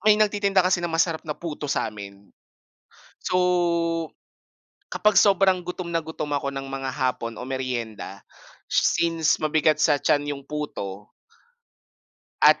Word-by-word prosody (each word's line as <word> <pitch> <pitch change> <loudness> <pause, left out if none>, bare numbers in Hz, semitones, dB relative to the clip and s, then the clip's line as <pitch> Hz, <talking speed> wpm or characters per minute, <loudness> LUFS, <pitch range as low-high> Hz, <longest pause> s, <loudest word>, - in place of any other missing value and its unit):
may 210 - +7
nagtitinda 200 -3 +2
kasi 185 -1 +2
ng 175 - -2
masarap 165 0 +1
na 150 - -3
puto 150 -3 -6
sa'min. 100 -5 -4 0.9
So, 170 -2 +1 0.8
kapag 210 -1 +3
sobrang 195 -2 +4
gutom 180 -1 -5
na 165 - +1
gutom 155 -2 -5
ako 140 0 -2
ng 135 0 -4
mga 135 0 -4
hapon 125 -4 -2
o 125 - -5
meryenda 120 -7 -4 0.5
since 165 -2 +2
mabigat 155 0 +3
sa 145 -2 +4
tiyan 145 0 +1
yung 140 - -13
puto 105 -10 -5 1.3
at - - +7
155 Hz, 130 wpm, -24 LUFS, 135-175 Hz, 1.3 s, may